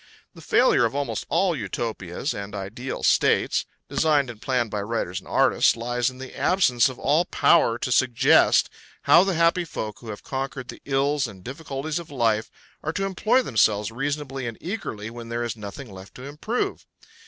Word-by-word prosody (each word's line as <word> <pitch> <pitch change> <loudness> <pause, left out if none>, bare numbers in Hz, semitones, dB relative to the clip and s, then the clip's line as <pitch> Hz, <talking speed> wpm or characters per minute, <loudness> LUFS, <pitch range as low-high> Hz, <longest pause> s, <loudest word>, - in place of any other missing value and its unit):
The - - -13
failure - - +3
of - - 0
almost 145 0 -3
all 185 -3 +2
Utopias 105 - -4
and 100 +1 -6
ideal 105 +7 -5
states, - - +2 0.2
designed 145 -5 +2
and 110 -2 -15
planned 125 -4 0
by 105 - -2
writers 100 -4 -3
and - - -18
artists, - - +3
lies 120 +2 0
in 130 - -12
the 130 0 -9
absence 130 -11 +3
of 130 - -9
all 150 +5 +2
power 120 -10 +3
to 125 - -3
suggest 120 -1 +4 0.4
how 170 - +7
the 195 -2 0
happy 170 +2 +3
folk 110 -10 -6
who 115 - -10
have 105 - -7
conquered 130 -1 -4
all - - -10
the 140 - -11
ills 140 0 +1
and 95 -4 -12
difficulties 140 - -4
of 170 - -10
life 115 -5 0 0.3
are 155 - -3
to 195 +2 -1
employ 215 +7 +2
themselves 105 - +2
reasonably 135 0 -3
and 115 - -6
eagerly 110 - -5
when 115 -1 -9
there 120 0 -2
is 115 -2 -3
nothing 105 +2 -9
left 95 +1 -12
to 125 - -10
improve. 150 - -3
125 Hz, 185 wpm, -24 LUFS, 115-150 Hz, 0.4 s, how